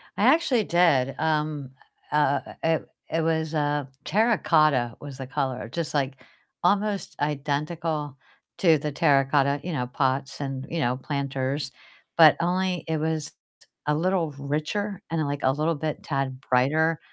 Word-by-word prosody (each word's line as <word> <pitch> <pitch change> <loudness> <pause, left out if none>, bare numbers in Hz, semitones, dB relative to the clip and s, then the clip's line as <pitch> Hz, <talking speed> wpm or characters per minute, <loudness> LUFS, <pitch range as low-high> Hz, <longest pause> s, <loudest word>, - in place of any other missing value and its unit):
I 205 - +1
actually 280 -8 +2
did, 165 -8 +3
um, 150 -3 -1 0.4
uh 145 -2 +3
uh - - -9
uh, 160 - +2
it - - -19 0.2
it 165 - 0
was, 160 -1 0
uh 145 -2 0 0.2
terracotta 155 - +3
was 140 -2 -8
the 135 -1 -6
color, 130 -4 -2
just, 165 +4 -3
like, 140 -2 0 0.5
almost 200 +2 +1
identical 150 0 -2 0.4
to 165 -4 +5
the 150 +1 -3
terracotta, 140 -1 +3
you 180 - -4
know, 125 -4 -1
pots 135 +1 -1
and, 135 -1 -4
you 165 - -2
know, 125 -3 +1
planters, 140 0 -2 0.5
but 160 -2 +8
only 180 +1 0
it 160 0 0
was 155 -1 -2 0.3
t - - -24 0.2
a 150 - +3
little 170 -1 +1
richer 155 +8 -2
and, 165 - 0
like, 145 - -4
a 130 - +4
little 160 +2 +1
bit 155 0 -4
tad 135 -2 -2
brighter, 155 +6 +3
150 Hz, 155 wpm, -26 LUFS, 140-165 Hz, 0.5 s, but